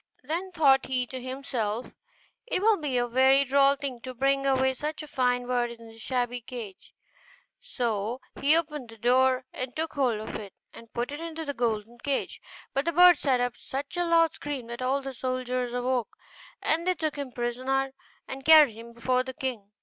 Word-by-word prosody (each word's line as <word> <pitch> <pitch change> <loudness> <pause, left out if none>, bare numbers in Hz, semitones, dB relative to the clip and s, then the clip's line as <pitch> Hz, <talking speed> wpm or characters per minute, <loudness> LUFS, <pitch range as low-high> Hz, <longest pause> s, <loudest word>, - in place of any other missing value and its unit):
Then 340 +7 -3
thought 280 -6 +4
he 255 -1 0
to 255 +1 -7
himself, 250 -4 -3 0.5
'It 475 - 0
will 430 +2 +4
be 290 -5 -2
a 245 - +2
very 265 +3 +5
droll 275 +1 +4
thing 275 -4 -5
to 255 +1 -7
bring 275 +2 +1
away 265 -1 +3
such 300 +3 -4
a - - -9
fine 250 -3 +1
bird 245 -1 0
in 230 -1 -11
this 225 0 -14
shabby 245 -1 -1
cage'; 225 -5 -9 0.6
so 235 - -2 0.2
he 295 +4 +5
opened 300 -7 -3
the 225 - -12
door 255 +3 +3
and 255 -1 -5
took 320 +1 -3
hold 255 -7 +1
of 215 - -6
it 200 -3 -9 0.2
and 230 -1 -13
put 240 +3 -3
it 290 - -5
into 325 -1 -5
the 285 - -3
golden 230 -1 -2
cage. 280 +2 -2 0.3
But 275 +2 0
the 335 - 0
bird 355 -1 +7
set 260 -4 +2
up 245 -1 -1
such 280 +5 -6
a 350 - +1
loud 335 -1 +4
scream 285 -4 -5
that 235 +1 -6
all 270 +2 0
the 270 0 -5
soldiers 255 -1 -2
awoke, 245 -1 -1 0.5
and 335 +3 0
they 365 - +3
took 310 -3 -2
him 280 -3 -5
prisoner 255 +3 -1 0.3
and 270 0 -7
carried 305 -5 +8
him 230 +2 -11
before 250 +2 +1
the 260 0 -7
king. 240 -7 -4
260 Hz, 195 wpm, -27 LUFS, 245-285 Hz, 0.6 s, carried